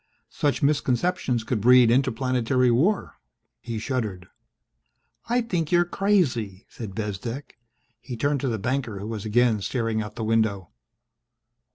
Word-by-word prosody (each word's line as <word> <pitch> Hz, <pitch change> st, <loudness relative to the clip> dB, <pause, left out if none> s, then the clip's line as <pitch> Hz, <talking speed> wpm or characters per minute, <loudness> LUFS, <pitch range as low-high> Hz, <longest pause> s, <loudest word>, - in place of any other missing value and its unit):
Such 145 Hz, -1 st, -1 dB
misconceptions 140 Hz, -2 st, +1 dB
could 110 Hz, -1 st, -2 dB
breed 125 Hz, 0 st, +6 dB
interplanetary 130 Hz, 0 st, +2 dB
war." 175 Hz, -, +1 dB, 0.4 s
He 115 Hz, -1 st, -5 dB
shuddered. 110 Hz, -7 st, -3 dB, 1.0 s
"I 245 Hz, +1 st, +2 dB
think 175 Hz, -9 st, -2 dB
you're 175 Hz, 0 st, +4 dB
crazy!" 135 Hz, -, 0 dB
said 105 Hz, -5 st, -8 dB
Bezdek. 115 Hz, +6 st, -5 dB, 0.4 s
He 120 Hz, 0 st, -7 dB
turned 145 Hz, +3 st, 0 dB
to 135 Hz, -, -1 dB
the 115 Hz, -, -1 dB
banker, 120 Hz, 0 st, -2 dB
who 100 Hz, -, -6 dB
was 110 Hz, -2 st, -5 dB
again 110 Hz, 0 st, +2 dB
staring 115 Hz, 0 st, -1 dB
out 105 Hz, 0 st, -7 dB
the 110 Hz, -, -4 dB
window. 110 Hz, -5 st, 0 dB
120 Hz, 135 wpm, -25 LUFS, 110-140 Hz, 1.0 s, breed